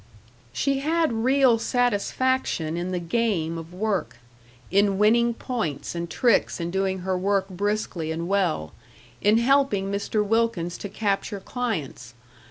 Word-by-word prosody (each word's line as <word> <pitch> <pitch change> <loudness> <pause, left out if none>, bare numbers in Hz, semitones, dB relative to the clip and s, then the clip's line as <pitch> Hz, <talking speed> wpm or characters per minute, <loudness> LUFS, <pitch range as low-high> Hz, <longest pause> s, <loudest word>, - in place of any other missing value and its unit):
She 275 -1 0
had 320 0 +1
real 250 +1 +3
satisfaction 245 -7 0
in 175 +1 -3
the 180 - -1
game 170 -3 -1
of 165 +1 -10
work 195 -2 -2 0.5
in 200 0 +3
winning 235 +3 +3
points 225 - -3
and 170 0 -4
tricks 235 -2 +2
in 170 0 -3
doing 190 0 -1
her 185 +1 -1
work 195 +1 +1
briskly 190 -4 -2
and 165 +1 -3
well, 175 - 0 0.5
in 210 +2 +4
helping 235 -6 +2
Mr. 205 +1 -1
Wilkins 210 -6 0
to 205 - -6
capture 200 0 -2
clients. 165 - -4
200 Hz, 135 wpm, -25 LUFS, 175-235 Hz, 0.5 s, in